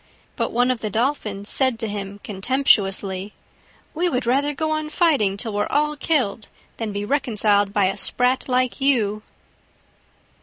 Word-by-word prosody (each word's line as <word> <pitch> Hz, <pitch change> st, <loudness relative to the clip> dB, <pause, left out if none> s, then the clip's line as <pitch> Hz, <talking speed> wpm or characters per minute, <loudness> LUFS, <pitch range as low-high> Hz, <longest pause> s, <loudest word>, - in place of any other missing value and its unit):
But -, -, -2 dB
one 245 Hz, +2 st, +2 dB
of 250 Hz, -, -3 dB
the 215 Hz, -, -2 dB
Dolphins 215 Hz, -3 st, -2 dB
said 260 Hz, -3 st, +4 dB
to 225 Hz, -1 st, -4 dB
him 200 Hz, -1 st, -6 dB
contemptuously, 195 Hz, -3 st, +1 dB, 0.6 s
"We 350 Hz, +3 st, 0 dB
would 255 Hz, -5 st, -2 dB
rather 275 Hz, +5 st, +1 dB
go 315 Hz, +2 st, -2 dB
on 310 Hz, 0 st, -2 dB
fighting 285 Hz, -, +2 dB
till 220 Hz, +1 st, -2 dB
we're 205 Hz, 0 st, 0 dB
all 300 Hz, +1 st, 0 dB
killed 255 Hz, -9 st, -1 dB, 0.3 s
than 225 Hz, -2 st, -3 dB
be 205 Hz, 0 st, -4 dB
reconciled 210 Hz, -6 st, +1 dB
by 200 Hz, -1 st, +2 dB
a 190 Hz, +1 st, 0 dB
Sprat 250 Hz, +5 st, 0 dB
like 255 Hz, +1 st, 0 dB
you!" 220 Hz, -7 st, +2 dB
230 Hz, 155 wpm, -22 LUFS, 205-275 Hz, 0.6 s, said